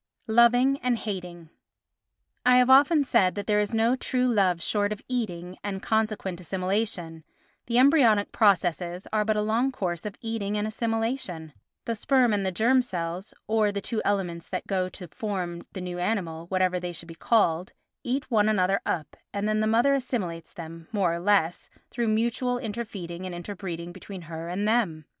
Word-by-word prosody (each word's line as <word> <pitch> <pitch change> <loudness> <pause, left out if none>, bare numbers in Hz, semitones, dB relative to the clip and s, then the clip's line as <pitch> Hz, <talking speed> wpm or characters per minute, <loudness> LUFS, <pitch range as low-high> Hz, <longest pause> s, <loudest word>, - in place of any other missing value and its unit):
Loving 245 +4 +4
and 250 -1 +1
Hating 180 -6 -6 0.9
I 250 0 +6
have 250 +1 +5
often 290 +3 +6
said 185 -8 +3
that 205 - -4
there 210 -1 +2
is 210 +2 -1
no 230 +3 +3
true 255 -1 0
love 195 -8 +2
short 205 +4 0
of 210 - -5
eating 185 -8 -3
and 195 -2 -4
consequent 215 -5 -1
assimilation; 185 -3 -2 0.4
the 235 0 +1
embryonic 250 -7 +5
processes 180 -3 +2
are 215 -1 +3
but 215 0 +1
a 210 - +1
long 230 +5 +1
course 175 -8 -3
of 210 -1 -5
eating 215 -3 -2
and 210 - 0
assimilation—the 225 - -3
sperm 250 0 +3
and 195 -3 -1
germ 255 +5 +4
cells, 180 -4 -4
or 215 -1 +2
the 200 - -3
two 220 +2 -3
elements 175 -4 -1
that 185 - -3
go 185 -2 -1
to 180 -1 -9
form 180 -4 -4
the 190 - -5
new 180 -1 -5
animal, 175 -4 -2
whatever 185 -1 +1
they 180 0 -4
should 170 0 -8
be 165 - -9
called, 180 -1 +1 0.3
eat 265 +2 -2
one 215 -2 +4
another 195 -2 +2
up, 155 -4 -2 0.2
and 205 +1 -2
then 215 0 +1
the 215 - +1
mother 235 +5 +4
assimilates 215 -11 -3
them, 165 -1 -9
more 195 -6 +1
or 170 - -3
less, 180 -3 +1 0.2
through 235 -1 -1
mutual 235 +3 +1
inter 235 0 -4
feeding 180 -3 -7
and 180 - -6
inter 175 +4 -6
breeding 175 -3 -6
between 190 0 -9
her 165 +1 -6
and 200 +4 -1
them. 195 -10 +1
205 Hz, 180 wpm, -26 LUFS, 175-225 Hz, 0.9 s, I